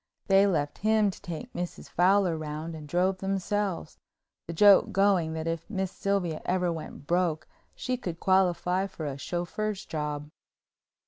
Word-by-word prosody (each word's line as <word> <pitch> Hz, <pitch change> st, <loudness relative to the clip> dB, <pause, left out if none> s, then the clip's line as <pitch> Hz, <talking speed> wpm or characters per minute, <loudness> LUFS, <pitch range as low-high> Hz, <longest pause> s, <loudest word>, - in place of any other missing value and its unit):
They 195 Hz, +1 st, +5 dB
left 150 Hz, -6 st, -1 dB
him 215 Hz, -1 st, +3 dB
to -, -, -14 dB
take 200 Hz, +7 st, -7 dB
Mrs. 175 Hz, 0 st, -5 dB
Fowler 185 Hz, -1 st, +3 dB
round 155 Hz, +1 st, -5 dB
and 155 Hz, -2 st, -8 dB
drove 185 Hz, +4 st, +1 dB
themselves, 195 Hz, -2 st, -2 dB, 0.5 s
the -, -, -4 dB
joke 200 Hz, +3 st, +6 dB
going 195 Hz, -5 st, +2 dB
that 160 Hz, 0 st, -4 dB
if 165 Hz, +2 st, -3 dB
Miss 190 Hz, -3 st, -2 dB
Sylvia 195 Hz, -6 st, -1 dB
ever 180 Hz, -2 st, 0 dB
went 155 Hz, -3 st, -8 dB
broke 170 Hz, -1 st, 0 dB, 0.3 s
she 255 Hz, 0 st, -2 dB
could 175 Hz, -8 st, -5 dB
qualify 185 Hz, 0 st, +2 dB
for 165 Hz, -5 st, -7 dB
a 140 Hz, -1 st, -4 dB
chauffeur's 190 Hz, +6 st, -3 dB
job. 150 Hz, -1 st, -4 dB
180 Hz, 150 wpm, -28 LUFS, 160-195 Hz, 0.5 s, joke